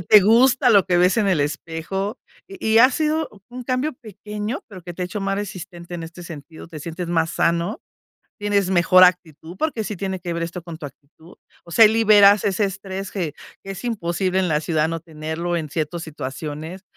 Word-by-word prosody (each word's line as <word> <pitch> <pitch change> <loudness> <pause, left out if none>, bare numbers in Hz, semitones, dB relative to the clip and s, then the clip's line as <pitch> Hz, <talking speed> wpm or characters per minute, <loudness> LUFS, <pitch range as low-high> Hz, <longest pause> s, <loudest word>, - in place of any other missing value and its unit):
eh, - - -6
te 210 +4 +7
gusta 245 +5 +4
lo 200 -4 +6
que 180 - +2
ves 180 +1 +4
en 215 -3 +2
el 185 -6 +2
espejo. 165 - -3 0.3
Y 390 -2 -10
y - - +7
ha 255 +3 +7
sido 310 +2 0 0.2
un 250 0 -8
cambio 255 +5 -1
pequeño, 210 +1 -6
pero 185 -4 -11
que 175 0 -8
te 180 - -4
ha - - 0
hecho 205 +4 -5
más 195 0 -1
resistente 180 -3 -7
en 170 - -5
este 170 +2 -10
sentido, 160 0 -10
te 160 - -8
sientes 170 +3 -6
más 165 -1 +1
sano, 170 +6 0 0.6
tienes 200 -2 +1
mejor 185 0 +5
actitud, 175 -1 +2
porque 310 -8 -1
sí 210 0 -5
tiene 190 0 -4
que 175 -1 -4
ver 170 0 -2
esto 170 +1 -7
con 170 -2 -9
tu 150 - -6
actitud. 150 +5 -17 0.3
O 170 - -12
sea, 225 - +7
ahí - - +3
liberas 210 -3 +6
ese 200 +1 +1
estrés 195 0 -6
que 170 -7 -3 0.3
que 195 - -5
es 195 - -9
imposible 185 -4 -1
en 190 - +2
la 150 -2 +1
ciudad 155 -1 0
no 165 0 -3
tenerlo 160 +2 -4
en 155 -2 -3
ciertos 160 +2 -3
situaciones. 155 +4 -6
180 Hz, 210 wpm, -22 LUFS, 165-205 Hz, 0.6 s, te